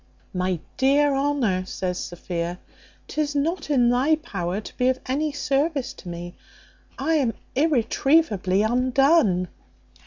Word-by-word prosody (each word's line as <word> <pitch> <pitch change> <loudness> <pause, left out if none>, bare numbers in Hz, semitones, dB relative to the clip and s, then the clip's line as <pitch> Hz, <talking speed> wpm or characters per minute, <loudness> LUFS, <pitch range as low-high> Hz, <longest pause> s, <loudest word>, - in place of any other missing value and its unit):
"My 185 -1 -1 0.2
dear 280 +2 +3
Honour," 270 -10 0
says 180 -2 -3
Sophia, 175 0 -4 0.5
"'tis 300 -1 -2
not 320 +4 -1
in 250 -5 +4
thy 265 +6 +3
power 195 - -4
to 215 - -10
be 250 - +1
of 260 0 0
any 295 +4 -1
service 280 0 -1
to 180 - -11
me. 175 +1 -7 0.6
I 300 +5 0
am 245 -7 0 0.2
irretrievably 255 - +2
undone." 250 - +3
255 Hz, 125 wpm, -24 LUFS, 185-290 Hz, 0.6 s, in